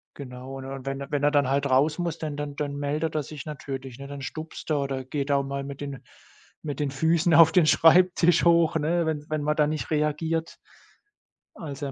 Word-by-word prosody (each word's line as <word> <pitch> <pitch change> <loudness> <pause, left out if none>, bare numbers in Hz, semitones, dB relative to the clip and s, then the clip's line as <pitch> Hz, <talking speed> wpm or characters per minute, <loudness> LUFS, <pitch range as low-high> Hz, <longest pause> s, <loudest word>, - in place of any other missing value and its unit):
Genau, 130 0 -8
und 135 0 -7
wenn 135 0 -4
wenn 145 -1 -1
er 145 - +4
dann 145 -3 +3
halt 140 +1 +1
raus 145 +5 +3
muss, 170 -2 -2
dann 150 -2 -4
dann 145 -1 -5
dann 145 -1 -3
meldet 150 +2 -2
er 150 - 0
sich 145 0 -9
natürlich, 135 -4 -7
ne? 140 - -8
Dann 140 -1 -8
stupst 155 +3 -7
er 145 -2 +2
oder 135 -1 -3
geht 140 +1 -3
auch 140 0 +2
mal 140 0 -4
mit 140 0 -8
den 140 -2 -6 0.6
mit 145 -2 -5
den 140 - -1
Füßen 160 +4 +2
auf 160 0 +8
den 180 -4 +5
Schreibtisch 175 +1 +5
hoch, 170 -1 +4
ne, 165 +2 0
wenn 150 -2 -2
wenn 155 -1 -2
man 150 +1 +1
da 150 - +3
nicht 155 +1 -4
reagiert. 160 +2 -1 1.0
Also, 145 -6 -6
er - - -5
145 Hz, 210 wpm, -26 LUFS, 140-160 Hz, 1.0 s, auf